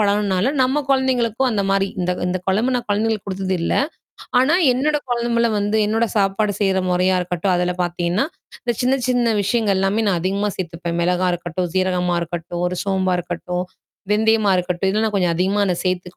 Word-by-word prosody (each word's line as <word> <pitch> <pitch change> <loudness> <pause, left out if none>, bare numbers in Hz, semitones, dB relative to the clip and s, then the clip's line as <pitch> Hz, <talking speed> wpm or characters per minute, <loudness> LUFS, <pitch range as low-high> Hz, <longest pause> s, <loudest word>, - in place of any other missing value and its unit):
பழகுன்னால 205 +3 +1
நம்ம 265 +3 +2
கொழந்தைங்களுக்கும் 260 -2 +1
அந்த 205 -3 0
மாரி 195 0 +2
இந்த 180 0 0
இந்த 180 +1 -1
கொழம்பு 220 +7 +2
நான் 245 - -2
கொழந்தைகளுக்கு 215 0 0
குடுத்தது 190 0 -2
இல்ல. - - 0 0.6
ஆனா, 265 +6 +4 0.2
என்னோட 295 +4 +1
கொழம்புல 235 -1 +1
வந்து 205 +1 0
என்னோட 225 +2 +1
சாப்பாடு 205 +1 +1
செய்ற 190 -1 +2
மொறையா 185 +1 +2
இருக்கட்டும், 180 +1 -1
அதில 180 0 0
பாத்தீங்கன்னா 175 +6 0 0.4
இந்த 240 -3 -1
சின்ன 265 +2 +2
சின்ன 240 -3 +2
விஷயங்கள்லாமே 200 -1 +1
நான் 180 -4 +1
அதிகமா 200 +3 0
சேர்த்துப்பேன். 170 -1 -4
மெளகா 180 +1 +1
இருக்கட்டும், 175 +1 -3
சீரகமா 180 -2 +1
இருக்கட்டும், 175 +1 -5
ஒரு 180 - -4
சோம்பா 190 -2 +1
இருக்கட்டும், 180 +1 -4 0.5
வெந்தயமா 215 -1 +3
இருக்கட்டும் 180 +1 -1
இதெல்லாம் 215 +2 +1
நான் 210 - -2
கொஞ்சம் 175 -3 +1
அதிகமா 195 +4 +1
நான் 185 -3 +1
அத - - -3
சேர்த்து 180 -1 -2
195 Hz, 170 wpm, -20 LUFS, 180-225 Hz, 0.6 s, ஆனா